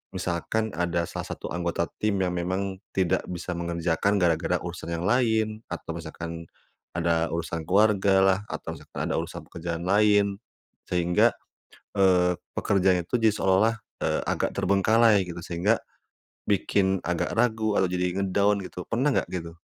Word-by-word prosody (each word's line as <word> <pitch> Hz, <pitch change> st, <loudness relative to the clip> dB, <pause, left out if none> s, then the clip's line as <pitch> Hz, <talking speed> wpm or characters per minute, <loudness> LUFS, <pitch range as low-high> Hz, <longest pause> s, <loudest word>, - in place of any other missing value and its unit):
misalkan 95 Hz, +5 st, -1 dB
ada 85 Hz, 0 st, -1 dB
salah -, -, -5 dB
satu -, -, -7 dB
anggota 85 Hz, 0 st, -1 dB, 0.2 s
tim 105 Hz, -1 st, +1 dB
yang 90 Hz, -, 0 dB
memang 95 Hz, +2 st, -2 dB, 0.2 s
tidak 95 Hz, -4 st, +1 dB
bisa 90 Hz, 0 st, -5 dB
mengerjakan 85 Hz, +3 st, 0 dB
gara-gara 85 Hz, -1 st, +2 dB
urusan 85 Hz, -1 st, -5 dB
yang 85 Hz, -, -4 dB
lain 110 Hz, -1 st, +1 dB
atau -, -, -6 dB
misalkan 85 Hz, +1 st, -7 dB, 0.5 s
ada 85 Hz, -1 st, +1 dB
urusan 85 Hz, -1 st, -4 dB
keluarga 100 Hz, 0 st, +4 dB
lah 95 Hz, 0 st, +4 dB
atau -, -, -5 dB
misalkan -, -, -6 dB
ada -, -, +1 dB
urusan -, -, -6 dB
pekerjaan 85 Hz, 0 st, -4 dB
lain. 100 Hz, +1 st, +3 dB, 0.5 s
Sehingga, 90 Hz, -1 st, +2 dB, 0.6 s
eee, 90 Hz, -2 st, +4 dB, 0.2 s
pekerjaan 95 Hz, -3 st, +2 dB
itu 120 Hz, +8 st, -1 dB
jadi 110 Hz, -2 st, +3 dB
seolah-olah, 95 Hz, +4 st, +3 dB, 0.3 s
eee, -, -, 0 dB
agak -, -, -1 dB
terbengkalai 105 Hz, +2 st, +4 dB
gitu. 85 Hz, 0 st, -7 dB
Sehingga 90 Hz, +6 st, +1 dB, 0.7 s
bikin 95 Hz, -1 st, +2 dB
agak 90 Hz, 0 st, -1 dB
ragu 110 Hz, -3 st, +2 dB
atau 95 Hz, -, +3 dB
jadi 90 Hz, +1 st, -1 dB
nge-down 100 Hz, +1 st, +2 dB
gitu, 90 Hz, -, -7 dB
pernah 130 Hz, +5 st, +2 dB
enggak -, -, 0 dB
gitu? 85 Hz, -2 st, -6 dB
95 Hz, 145 wpm, -26 LUFS, 85-100 Hz, 0.7 s, keluarga